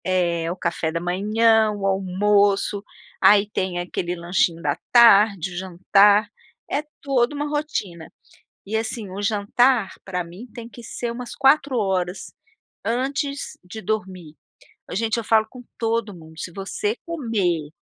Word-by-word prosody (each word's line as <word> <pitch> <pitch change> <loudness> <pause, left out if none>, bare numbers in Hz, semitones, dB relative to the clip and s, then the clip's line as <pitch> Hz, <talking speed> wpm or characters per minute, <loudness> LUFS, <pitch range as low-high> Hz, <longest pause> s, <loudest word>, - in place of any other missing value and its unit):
É, 170 -3 0
o - - -4
café 170 -3 -2
da 170 - -2
manhã, 215 +5 +2
o 205 -2 -4
almoço, 200 +1 +2 0.4
aí 200 +1 +6
tem 190 -3 -2
aquele 175 0 -3
lanchinho 170 -1 0
da 145 -2 0 0.2
tarde, 205 -6 +6
o - - -7
jantar, 195 +3 +4 0.4
é 290 - -1 0.2
toda 270 0 +1
uma 295 +1 -2
rotina. 250 - -4 0.5
E 215 +3 -2
assim, 220 -2 -4
o 190 +2 -6
jantar 210 +2 +2
pra 180 -2 -3
mim 180 +8 -11
tem 235 -1 -8
que 240 0 -13
ser 235 +1 -4
umas 245 0 -7
4 275 -1 +3
hora, 185 -4 0 0.7
antes 275 +4 -2
de 215 +5 -9
dormir. 185 -6 -4 0.6
Ô - - -4
gente, 220 +2 0
eu 230 - -2
falo 220 0 +3
com 250 +1 -12
todo 225 -2 -1
mundo, 160 -2 -14
se 175 - -5
você 200 +4 -3
comer 210 - -1
205 Hz, 150 wpm, -22 LUFS, 180-230 Hz, 0.7 s, aí